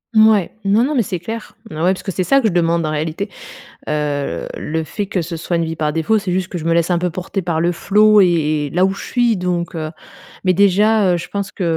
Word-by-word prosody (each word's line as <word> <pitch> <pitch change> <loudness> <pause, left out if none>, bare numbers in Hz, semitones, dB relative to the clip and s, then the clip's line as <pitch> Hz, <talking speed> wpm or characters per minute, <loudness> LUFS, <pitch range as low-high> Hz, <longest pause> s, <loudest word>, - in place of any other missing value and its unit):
Mouais, 215 -4 +5 0.2
non, 205 +4 +3
non, 295 +4 0
mais 245 - +3
c'est 180 -3 -4
clair. 225 +6 -7
Oh - - -9
ouais, 175 +4 +2
parce 185 - -8
que 195 - -4
c'est 185 - -1
ça 275 +8 +3
que 230 - +2
je - - 0
demande 170 -1 +2
en 155 - -1
réalité, 160 +6 -3 0.6
heu, 145 -2 -2
le 160 +1 -3
fait 205 +7 -4
que 195 -1 -2
ce 170 0 -5
soit 170 +2 -2
une 165 -1 0
vie 160 0 -4
par 150 -1 -1
défaut, 165 +8 +1
c'est 195 -3 -3
juste 185 0 -1
que 185 - -6
je 160 - -5
me 165 - +1
laisse 170 +1 +2
un 175 - +2
peu 180 +1 -1
porter 185 +3 -4
par 165 -2 -1
le 170 +1 +2
flow 210 +3 +4
et 165 -4 +2
et 145 - -5
là 180 +5 +2
où 195 - -1
je - - -8
suis, 240 -3 +1
donc, 180 -2 -2
heu, 155 -1 -4 0.5
mais 185 - +3
déjà, 200 +1 +3
heu, - - +1
je 170 - -7
pense 200 -1 -4
que, 190 - -4
180 Hz, 270 wpm, -18 LUFS, 165-200 Hz, 0.6 s, Mouais